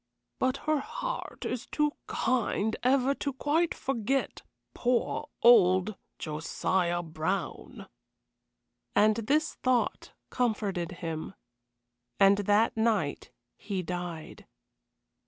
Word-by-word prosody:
But 260 +1 +1
her 310 -1 +2
heart - - -5
is 250 +1 -3
too 300 -1 +1 0.2
kind 225 -3 0
ever 260 +1 +3
to 280 0 -3
quite 310 +6 +1
forget 265 +1 -1 0.3
poor 250 +4 0
old 195 -3 +6 0.2
Josiah 175 +3 -1
Brown." 160 +4 -4 1.1
And 215 +1 +4
this 290 +8 +1
thought 255 -2 0 0.2
comforted 205 -8 -1
him. 165 +3 -4 0.8
And 200 +1 +6
that 205 +3 +3
night 225 0 0 0.3
he 195 -3 -3
died. 175 -2 -6
220 Hz, 95 wpm, -29 LUFS, 185-260 Hz, 1.1 s, old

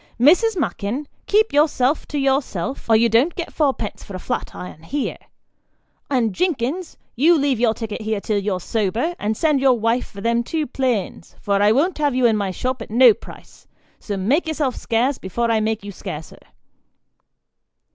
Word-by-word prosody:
" - - -34
Mrs. 440 +5 +3
Mackin, 230 - -2 0.2
keep 430 -2 +3
yourself 290 -2 +2
to 295 - -4
yourself, 270 - -1
or 225 - +6
you 230 +2 +5
don't 240 +9 +2
get 345 - -5
fourpence 270 -8 -1
for 200 - -9
a - - -5
flat - - -4
iron 180 -3 -9
here; 275 - -3 0.9
and 240 -7 +1
Jinkins, 330 - -2 0.2
you 320 +7 +5
leave 280 -5 +1
your 230 -2 +2
ticket 225 0 -5
here 215 -1 -1
till 205 0 -1
you're 195 -2 -2
sober, 225 - -1
and 215 +1 -1
send 300 -4 +2
your 260 -3 +4
wife 230 +3 0
for 200 - -11
them 235 +2 +1
two 310 +6 -2
planes, 240 - -2
for 200 -1 0
I 205 +1 +5
won't 305 +9 +1
have 290 -4 +1
you 255 -1 +2
in 225 -2 +4
my 200 -2 -1
shop 255 +6 -3
at - - -8
no 240 +1 +7
price; - - -15 0.3
so 205 -2 -4
make 265 - +1
yourself 295 -5 -1
scarce, 245 +4 0
before 230 +5 -1
I 225 - +2
make 215 -1 -1
you 205 - -6
scarcer." 160 -4 -8
240 Hz, 185 wpm, -21 LUFS, 215-285 Hz, 0.9 s, no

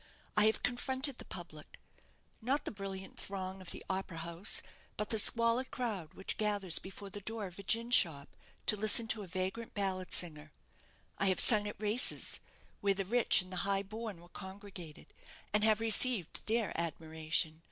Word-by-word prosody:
I 210 - +7
have 220 - +2
confronted 260 +2 -1
the - - -8
public 165 -4 -6 0.6
not 265 +6 0
the - - -3
brilliant 195 -2 -7
throng 190 -1 -5
of 185 - -7
the - - -8
opera 190 -3 -3
house, 170 +4 0 0.3
but 210 0 -2
the 220 - +2
squalid 230 +4 +3
crowd 205 -11 -4
which 190 - -4
gathers 205 -5 +2
before 195 +1 -9
the 205 - -7
door 220 +1 -4
of 185 0 -9
a - - -5
gin 230 +4 0
shop, 155 - +3 0.3
to - - +7
listen 215 +2 +2
to 220 - 0
a 195 - -8
vagrant 185 +5 -4
ballad 190 -2 -2
singer. 155 -3 -2 0.7
I 195 - +3
have 185 - +2
sung 210 -3 +5
at 210 - -7
races, 215 +4 +2 0.4
where 200 -1 +2
the 195 0 -2
rich 235 -2 +3
and 185 - -11
the 185 - -4
high 195 +1 0
born 215 -1 -6
were 175 +1 -16
congregated, 190 -5 -10 0.4
and 210 0 +3
have 215 0 +5
received 225 -4 +4
their 225 -1 +1
admiration. 160 0 -1
200 Hz, 175 wpm, -34 LUFS, 185-220 Hz, 0.7 s, I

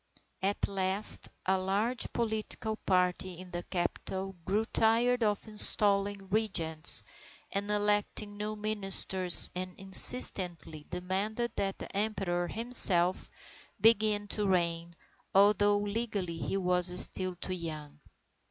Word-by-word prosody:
_ - - -16 0.3
At 205 - -3
last 195 +1 +1 0.2
a 190 0 +1
large 205 +6 -2
political 220 -1 -3
party 180 -2 -1
in 185 -1 -12
the 175 - -5
capital 190 +2 -4
grew 210 +4 -1
tired 235 +3 +1
of 210 -1 -2
installing 200 -2 +3
Regents 170 -7 +4 0.5
and 200 +1 -4
electing 205 0 -1
new 210 +1 -5
ministers, 195 -3 +1
and 185 0 -7
insistently 180 -6 +3
demanded 200 +6 -3
that 195 -1 -3
the - - -10
Emperor 195 -4 -2
himself 190 -6 +2 0.5
begin 215 -1 +2
to 210 -1 -2
reign, 170 -2 -1 0.4
although 205 +1 +4
legally 205 -5 -4
he 195 - -3
was 180 -1 +1
still 185 -1 +1
too 185 +1 -5
young. 155 -4 -8
195 Hz, 115 wpm, -29 LUFS, 180-210 Hz, 0.5 s, Regents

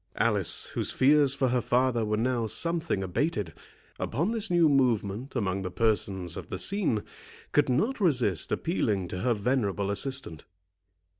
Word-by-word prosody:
Alice, - - +2
whose - - 0
fears 140 0 +4
for 130 -2 +1
her 125 0 +1
father 120 -1 +1
were 105 0 -1
now 120 0 0
something 165 - -1
abated, 100 - -2 0.5
upon 165 - -1
this 225 -2 0
new 175 -2 +4
movement 125 -3 0
among 100 -5 -1
the 90 - -4
persons 95 -3 -1
of - - -8
the - - -4
scene, 185 - 0 0.5
could 145 -2 +2
not 215 - 0
resist 125 - +1
appealing 105 - -1
to 90 - -5
her 120 +4 +1
venerable 100 -3 -1
assistant. 130 - -2
125 Hz, 150 wpm, -28 LUFS, 100-145 Hz, 0.5 s, fears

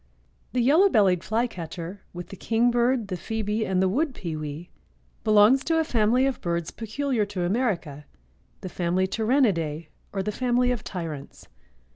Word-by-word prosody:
_) - - -39 0.5
The 250 - +2
Yellow 320 +10 +5
bellied 190 - +3
Flycatcher 185 -5 -3
with 175 -1 -8
the - - -8
kingbird, 235 +1 +1
the 185 - -2
phoebe 220 +2 -2
and 185 0 +1
the - - +3
wood 265 - 0
pewee 155 -1 -6 0.5
belongs 215 +5 +5
to 325 -1 +2
a 320 - +3
family 240 -1 +2
of 270 -1 -1
birds 170 -2 -2
peculiar 235 +1 -2
to 195 -3 -3
America—the 170 - -4
family 180 +2 0
Tyrannidæ 190 - +1 0.2
or 195 -1 -2
the 210 - -2
family 250 +2 +1
of 245 - -3
tyrants. 160 -7 -7
210 Hz, 150 wpm, -25 LUFS, 175-245 Hz, 0.5 s, Yellow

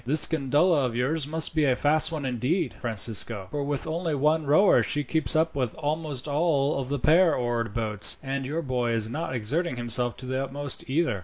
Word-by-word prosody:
"This 145 +5 +4
gondola 145 0 +1
of 115 - -6
yours 140 +4 -1
must 160 +1 -1
be 155 -1 +1
a 130 -3 +3
fast 155 +4 +4
one 155 -4 -4
indeed, 130 - -1
Francisco, 110 -3 0
for 145 -1 -2
with 140 -1 -3
only 160 0 -2
one 150 +2 +1
rower 155 +8 +5
she 145 -1 0
keeps 160 +4 0
up 160 +1 +2
with 125 -5 -2
almost 150 -3 -3
all 145 -2 0
the 140 +3 -3
pair 165 +5 +4
oared 120 -3 -2
boats, 105 -3 0
and 135 0 -3
your 155 +6 -3
boy 125 -3 -1
is 110 -1 +1
not 155 -1 -4
exerting 140 +8 -1
himself 120 0 -2
to 130 - -9
the 130 +1 -2
utmost, 140 0 -5
either." 145 - 0
140 Hz, 200 wpm, -26 LUFS, 125-155 Hz, -, rower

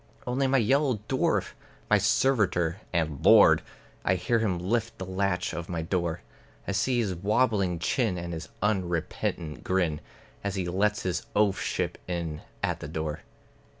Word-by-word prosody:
Only 130 +2 +1
my 135 +1 +3
yellow 130 0 +2
dwarf; 130 - +1 0.4
(my 105 - +4
servitor 105 -5 +2
and 80 -5 -1
lord!) - - +7 0.4
I 90 - +2
hear 105 +6 +1
him 100 -5 0
lift 110 +6 -1
the 95 - -5
latch 95 0 -1
of 85 -1 -5
my 85 -2 -2
door; 85 -1 -1 0.5
I - - 0
see 120 +6 +1
his 105 -6 0
wobbling 100 -1 +1
chin 100 +3 0
and 85 0 -5
his 80 - -6
unrepentant 85 -5 -1
grin, 90 -5 0 0.4
As 100 -1 -2
he 95 -2 -2
lets 105 +4 +1
his 90 -1 -2
oafship 100 -2 +1
in 85 -4 -3 0.2
at - - 0
the - - -6
door. 80 -1 -3
95 Hz, 150 wpm, -28 LUFS, 85-110 Hz, 0.5 s, lord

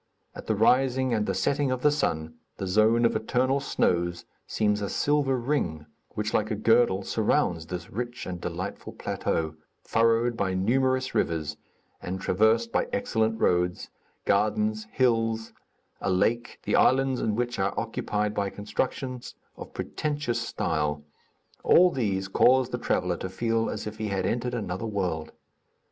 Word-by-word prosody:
At - - -10
the 110 - +1
rising 130 +3 +3
and 105 -2 0
the - - 0
setting 140 -1 +1
of 130 -1 -2
the 150 - +5
sun, 80 - -1 0.2
the 95 - -3
zone 110 +5 +3
of 115 - +2
eternal 125 +5 +1
snows 85 -9 0 0.2
seems 105 -1 +1
a 100 - -2
silver 145 -3 +1
ring, 115 - -1 0.3
which 105 +1 -2
like 110 0 +1
a 110 - -1
girdle 110 -2 +3
surrounds 90 -6 0
this 90 0 -6
rich 120 +3 -4
and 90 -1 -5
delightful 90 +3 -5
plateau, 80 -1 -2 0.3
furrowed 115 +1 +2
by 95 -4 -1
numerous 130 +6 +1
rivers 80 -2 -1 0.5
and 95 +1 -4
traversed 110 +5 +2
by - - +1
excellent 110 +2 0
roads, 90 0 +1 0.3
gardens, 110 +1 +1
hills, 115 -3 +1 0.5
a - - -1
lake, 115 +6 +1
the - - 0
islands 135 -1 +3
in 105 - 0
which 120 0 -2
are 95 0 0
occupied 105 -2 -2
by 100 -1 -1
constructions 125 +5 -4 0.2
of - - -9
pretentious 145 -6 -2
style, 75 -9 -1 0.6
all 180 +1 +6
these 100 - -1
cause 130 +5 +4
the 125 - -3
traveller 90 -5 0
to 95 - -5
feel 115 +3 0
as - - -4
if 105 0 -7
he 110 - -2
had 95 -2 -1
entered 120 +3 -1
another 105 -1 -3
world. 90 -7 -2
110 Hz, 155 wpm, -27 LUFS, 95-120 Hz, 0.6 s, all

